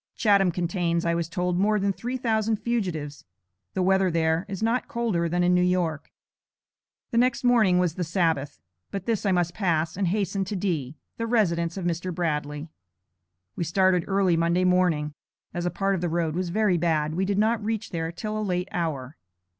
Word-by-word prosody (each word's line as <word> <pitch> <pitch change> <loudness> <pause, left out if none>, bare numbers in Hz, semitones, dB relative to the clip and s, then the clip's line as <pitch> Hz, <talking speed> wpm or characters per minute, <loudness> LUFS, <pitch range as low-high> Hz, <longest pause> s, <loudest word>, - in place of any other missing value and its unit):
Chatham 200 -4 +4
contains, 170 -1 -1
I 170 - +2
was 170 -1 -2
told, 180 +1 -1
more 210 +2 +3
than 200 0 +1
three 245 +6 -4
thousand 225 -3 +1
fugitives. 180 -11 -3 0.5
The 185 - +1
weather 190 0 +3
there, 165 +2 +1
is 195 +1 -4
not 230 +3 +1
colder 210 -8 -1
than 175 +1 +1
in 180 0 +3
New 180 - +4
York. 180 -4 0 1.0
The 235 - +2
next 250 0 +2
morning 225 -7 +4
was 180 -3 +2
the 180 - -3
Sabbath, 160 -5 0 0.3
but 195 -2 -5
this 220 -3 0
I - - +3
must 175 -2 +1
pass 165 -5 0
and 195 0 0
hasten 195 +1 0
to 205 - -4
D., 160 -8 -2 0.2
the 230 - -2
residence 170 -7 +1
of 185 - -4
Mr. 175 +1 -2
Bradley. 150 -3 -2 0.9
We - - -2
started 180 +1 +2
early 195 -3 +2
Monday 170 +2 +2
morning. 180 -5 +2 0.4
As 175 0 -2
a - - +2
part 195 +2 0
of 185 - -1
the 175 - 0
road 165 -1 0
was 180 +1 -2
very 195 -2 +2
bad, 155 -2 +1
we 185 +4 0
did 195 +1 0
not 220 +1 +2
reach 220 0 -3
there 165 -2 -2
till 215 +5 -5
a 215 - -1
late 180 -2 -1
hour. 155 -7 -3
180 Hz, 195 wpm, -26 LUFS, 170-200 Hz, 1.0 s, Chatham